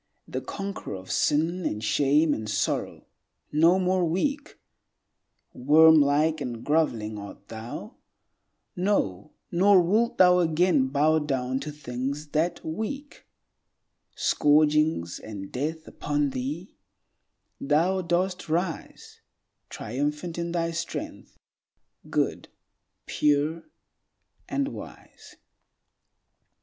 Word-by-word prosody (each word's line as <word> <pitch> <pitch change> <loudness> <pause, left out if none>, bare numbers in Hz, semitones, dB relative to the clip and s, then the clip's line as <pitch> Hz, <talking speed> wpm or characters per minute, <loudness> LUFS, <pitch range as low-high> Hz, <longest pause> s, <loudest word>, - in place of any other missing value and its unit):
the - - -4
conqueror 200 - -6
Of 95 0 -8
sin 165 +5 +1
and 105 -7 -3
shame 145 +6 +3
and 110 -4 -4
sorrow; 105 - -2 0.5
no 165 +5 +4
more 185 0 +1
weak, 275 - -1 1.0
Wormlike, 155 +2 +5
and 120 -2 -5
groveling 115 -9 0
art 100 0 -11
thou; 110 +1 -8 0.8
no, 155 - -1 0.2
nor 190 +2 +5
Wilt 215 +7 +1
thou 180 -1 +6
again 165 -4 +2
bow 150 +3 +2
down 130 -3 -2
to 150 - -6
things 140 +1 -5
that 160 +4 -1
weak 270 - -5 0.9
Scourgings 150 - +2
and 100 -3 -8
death 155 +5 -4
upon 145 -1 -1
thee; 145 +9 -5 0.9
thou 185 - +1
dost 180 +1 -1
rise 165 +1 -4 0.5
Triumphant 150 +8 -3
in 170 0 -3
thy 170 -1 -1
strength; 170 0 -6 0.7
good, - - -1 0.6
pure 150 +2 +1 0.8
and 280 0 -1
wise. - - -12
155 Hz, 95 wpm, -26 LUFS, 140-175 Hz, 1.0 s, thou